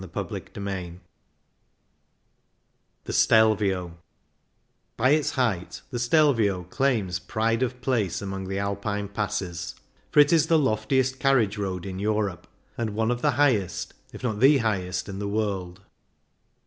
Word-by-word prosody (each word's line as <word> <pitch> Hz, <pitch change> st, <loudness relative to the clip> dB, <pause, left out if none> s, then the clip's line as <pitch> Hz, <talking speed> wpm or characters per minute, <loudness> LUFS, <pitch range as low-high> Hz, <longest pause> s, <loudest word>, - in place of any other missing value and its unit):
H -, -, -7 dB
Z -, -, -12 dB
o -, -, 0 dB
CHAPTER -, -, -8 dB
II 90 Hz, -3 st, -5 dB, 2.0 s
THE -, -, -5 dB
STELVIO 100 Hz, -6 st, +3 dB, 1.0 s
By 130 Hz, +4 st, +3 dB
Its 150 Hz, 0 st, +3 dB
height 100 Hz, -7 st, -2 dB
the 120 Hz, -, -3 dB
Stejvio 120 Hz, -, +3 dB
claims 110 Hz, -10 st, 0 dB
pride 115 Hz, +4 st, -1 dB
of 125 Hz, 0 st, -1 dB
place 115 Hz, -10 st, 0 dB
among 95 Hz, -1 st, -5 dB
the 95 Hz, +1 st, -3 dB
Alpine 100 Hz, +1 st, -2 dB
passes, 90 Hz, -4 st, -3 dB, 0.3 s
for -, -, +3 dB
it 145 Hz, +2 st, +6 dB
is 160 Hz, -3 st, +4 dB
the 165 Hz, -, +4 dB
loftiest 130 Hz, 0 st, +1 dB
carriage 115 Hz, -7 st, +2 dB
road 95 Hz, -3 st, -3 dB
in 95 Hz, -1 st, -5 dB
Europe, 105 Hz, -4 st, -1 dB, 0.3 s
and 110 Hz, -3 st, -2 dB
one 110 Hz, +1 st, +1 dB
of 120 Hz, 0 st, -2 dB
the -, -, +3 dB
highest, 120 Hz, -11 st, +1 dB, 0.2 s
if -, -, -11 dB
not 110 Hz, -4 st, -1 dB
the 140 Hz, +4 st, +6 dB
highest, 95 Hz, -7 st, -1 dB
in 100 Hz, -1 st, -6 dB
the 100 Hz, -, -3 dB
world. 100 Hz, -4 st, -2 dB
105 Hz, 150 wpm, -25 LUFS, 95-125 Hz, 2.0 s, it